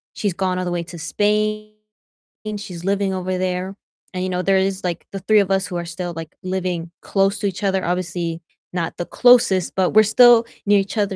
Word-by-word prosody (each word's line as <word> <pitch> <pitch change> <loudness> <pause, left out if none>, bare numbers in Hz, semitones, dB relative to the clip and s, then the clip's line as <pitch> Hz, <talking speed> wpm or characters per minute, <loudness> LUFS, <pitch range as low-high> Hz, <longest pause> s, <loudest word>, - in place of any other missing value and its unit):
She's 205 -3 -1
gone 185 +1 -1
all 185 - -2
the 175 - -2
way 175 -1 -2
to 170 +1 -10
Spain, 215 +5 0 0.9
she's 180 -4 -8
living 200 0 0
over 185 0 -2
there. 185 +1 -2 0.4
And, 185 - -3
you 185 - -2
know, 180 0 -1
there 195 0 +3
is, 190 0 -1
like, 175 -2 -4
the 195 - -5
3 210 +3 +3
of 195 - +1
us 195 +1 +2
who 180 - -6
are 170 - -4
still, 175 +1 -5
like, 165 -1 -8
living 180 -2 -3
close 195 +1 +1
to 200 - 0
each 195 +1 -5
other, 190 -1 +1
obviously 170 -1 -2 0.3
not 170 -2 -3
the 175 - -3
closest, 245 -7 +4
but 185 -1 +2
we're 215 +1 +6
still 235 +2 +6 0.2
near 205 -1 +5
each 195 +3 -4
other. 200 -2 0
190 Hz, 215 wpm, -21 LUFS, 180-200 Hz, 0.9 s, we're